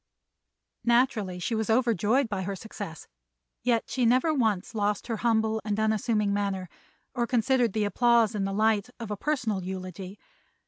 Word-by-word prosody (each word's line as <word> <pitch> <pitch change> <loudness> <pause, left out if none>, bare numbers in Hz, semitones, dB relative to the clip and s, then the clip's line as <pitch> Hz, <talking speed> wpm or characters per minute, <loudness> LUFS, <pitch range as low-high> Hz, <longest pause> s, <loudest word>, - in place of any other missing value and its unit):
Naturally 235 -6 +2
she 180 +6 -3
was 220 0 -1
overjoyed 230 +2 +2
by 200 -3 -3
her 195 +1 -3
success, 195 -4 -8 0.5
yet 235 -2 +1
she 255 0 -1
never 255 +7 +3
once 220 -8 0
lost 210 -1 -1
her 230 -2 -3
humble 220 -1 +1
and 210 0 -2
unassuming 215 -1 +1
manner 195 -3 -2 0.4
or 240 -2 -1
considered 245 -2 +2
the 215 - 0
applause 235 +1 +3
in 205 -2 -1
the 195 - -1
light 215 +1 +1
of 225 -3 -6
a - - -1
personal 230 -6 -1
eulogy. 185 +1 -6
220 Hz, 155 wpm, -27 LUFS, 200-235 Hz, 0.5 s, never